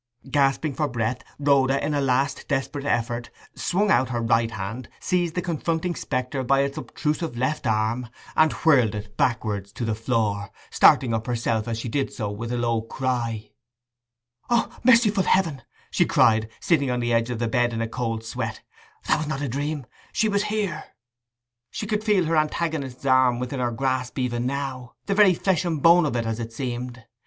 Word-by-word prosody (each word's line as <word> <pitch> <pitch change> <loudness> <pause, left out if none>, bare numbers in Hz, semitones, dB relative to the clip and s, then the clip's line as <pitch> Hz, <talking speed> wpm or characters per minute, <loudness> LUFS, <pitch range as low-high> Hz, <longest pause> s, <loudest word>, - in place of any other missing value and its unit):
Gasping 140 +1 +2
for 150 +2 0
breath, 120 -1 -2 0.2
Rhoda, 140 -1 +3
in 150 - -1
a 145 - +1
last 135 +1 0
desperate 140 0 -2
effort, 120 -1 -1 0.2
swung 200 +3 0
out 130 +1 +3
her 120 -2 -2
right 115 0 +2
hand, 110 +4 -6
seized 175 -3 0
the 180 - -1
confronting 170 0 -1
spectre 130 -3 -3
by 135 +2 +3
its 140 0 -1
obtrusive 150 -4 -3
left 130 +2 -1
arm, 110 +2 0 0.3
and 155 0 +5
whirled 125 -10 +3
it 105 0 -7
backward 105 -5 0
to 115 +4 -5
the 110 - 0
floor, 105 -3 -1 0.2
starting 120 -4 +5
up 110 0 -2
herself 115 -2 -1
as 115 -1 -2
she 115 - -4
did 135 +4 -1
so 105 -3 -4
with 115 +3 -5
a 120 - -1
low 115 -1 0
cry. 115 -2 -3 1.0
'O, 235 -1 +1
merciful 230 -5 +5
heaven!' 165 -7 +1 0.3
she - - +3
cried, 110 0 +3
sitting 140 -6 +2
on 125 0 0
the 120 0 0
edge 115 +1 +2
of 120 - -2
the 115 0 -1
bed 120 +1 +1
in 115 - -3
a 115 - -1
cold 115 -1 -3
sweat; 115 - -4 0.4
'that - - +3
was 155 - -3
not 145 -1 -3
a - - -1
dream—she 145 - -3
was 200 0 +1
here!' 205 -7 -2 0.8
She - - -5
could 210 0 -1
feel 205 -5 +3
her 160 0 +1
antagonist's 150 -4 -1
arm 130 -2 +4
within 125 +2 -4
her 125 -1 +1
grasp 130 +1 -2
even 125 -1 -1
now—the 135 +5 -4
very 195 -3 +6
flesh 185 -1 +1
and 165 -4 -1
bone 170 +2 +6
of 135 - -3
it, 115 -1 0
as 115 0 -2
it 115 0 -5
seemed. 125 0 -5
130 Hz, 185 wpm, -24 LUFS, 115-155 Hz, 1.0 s, very